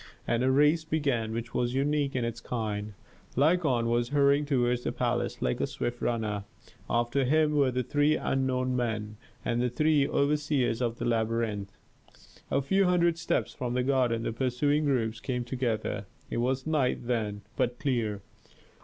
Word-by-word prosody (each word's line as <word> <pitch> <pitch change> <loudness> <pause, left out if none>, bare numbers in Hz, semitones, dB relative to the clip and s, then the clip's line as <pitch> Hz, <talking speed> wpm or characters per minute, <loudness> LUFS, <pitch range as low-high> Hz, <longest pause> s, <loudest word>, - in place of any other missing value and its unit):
And 120 +1 +1
a 130 - +3
race 150 +4 +4
began 140 -8 0
which 115 +1 -5
was 120 +1 0
unique 140 0 +1
in 125 -2 0
its 115 0 -4
kind: 105 -3 -3 0.4
Lykon 145 -4 +3
was 120 +1 +1
hurrying 140 +1 +3
toward 125 -3 +2
the - - -2
palace, - - -1
like 60 - 0
a - - +1
swift 120 0 -4
runner; 110 -4 -1 0.4
after 120 +4 +1
him 155 +3 +3
were 140 -3 +3
the 125 0 -1
three 145 +4 +2
unknown 130 -1 0
men, 110 -3 -2 0.3
and 120 0 0
the 125 - +1
three 150 +2 +2
overseers 140 -4 +1
of 120 -1 -1
the 120 - -3
labyrinth. 110 -3 -1 0.7
A 140 - +1
few 195 +8 +3
hundred 170 -2 +2
steps - - -1
from 125 -1 -3
the 125 - +1
garden 125 -4 +1
the - - -2
pursuing 140 +5 +1
groups 115 -5 0
came 125 -1 -2
together. 115 -5 -2 0.2
It - - -2
was 130 +2 0
night 145 -6 0
then, 110 -4 -1
but 120 0 0
clear. 115 -7 -1
125 Hz, 165 wpm, -29 LUFS, 115-140 Hz, 0.7 s, race